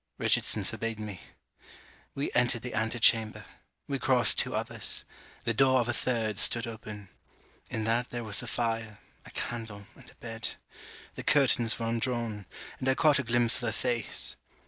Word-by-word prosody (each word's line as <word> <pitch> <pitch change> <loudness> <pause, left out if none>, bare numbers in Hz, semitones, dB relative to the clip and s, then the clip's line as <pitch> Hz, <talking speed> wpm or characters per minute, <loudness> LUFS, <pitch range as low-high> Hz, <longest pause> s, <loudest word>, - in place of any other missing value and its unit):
Richardson - - +2
forbade 115 -1 -4
me. 105 -4 -6 0.9
We 140 - -2
entered 120 -1 +2
the 125 - -5
antichamber. 110 0 +2 0.4
We 140 -1 -2
crossed 125 -4 +4
two - - 0
others. - - 0 0.4
The 115 - 0
door 130 +2 +4
of 120 - 0
a 120 - 0
third 115 -4 -1
stood 115 0 +4
open. 110 -3 -8 0.6
In 110 - -3
that 115 +2 0
there 120 -1 -4
was 105 -3 +1
a 120 - -8
fire, 115 -2 -2 0.3
a - - -10
candle, 110 -4 -5
and - - -16
a - - -18
bed. 115 -1 -4 0.6
The - - -6
curtains 125 -6 +3
were 115 - -3
undrawn; 115 -3 -2 0.3
and 130 - 0
I 130 - +3
caught 150 -1 +4
a - - -1
glimpse 120 0 +4
of - - -6
her 120 -2 -1
face. 120 0 0
115 Hz, 170 wpm, -29 LUFS, 110-125 Hz, 0.9 s, crossed